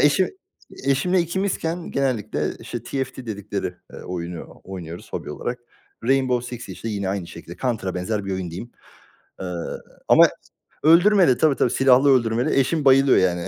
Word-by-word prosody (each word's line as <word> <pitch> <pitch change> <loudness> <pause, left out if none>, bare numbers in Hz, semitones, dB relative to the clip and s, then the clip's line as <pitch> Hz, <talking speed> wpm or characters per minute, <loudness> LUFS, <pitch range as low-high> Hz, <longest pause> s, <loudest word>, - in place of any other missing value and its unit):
eşim 150 +6 +4 0.6
eşimle 175 +7 +2
ikimizken 170 -1 -2
genellikle, 125 -6 -1
işte, 120 -2 -6
TFT 130 +1 -4
dedikleri, 100 -2 -3 0.3
eee, - - -9
oyunu 85 -1 -6
oynuyoruz 90 -3 -8
hobi - - -4
olarak. 120 +10 -4 0.5
Rainbow 125 -1 +1
Six, 120 - -10
işte, 115 - -6
yine 100 -3 -2
aynı 95 -3 -2
şekilde. 85 +1 -10
Counter'a 110 -8 -2
benzer 100 +3 -2
bir 95 - -3
oyun 95 -2 -3
diyeyim. 95 +9 -7 0.7
Iıı, 90 -2 -4 0.3
ama - - +7 0.5
öldürmeli. 170 -3 +6
Tabii, 155 -3 +3
tabii. 125 - +2
silahlı 135 +1 +5
öldürmeli. 120 0 +3
Eşim 150 +2 +1
bayılıyor, 135 0 +6
yani, 90 -2 +1
120 Hz, 145 wpm, -23 LUFS, 95-140 Hz, 0.7 s, ama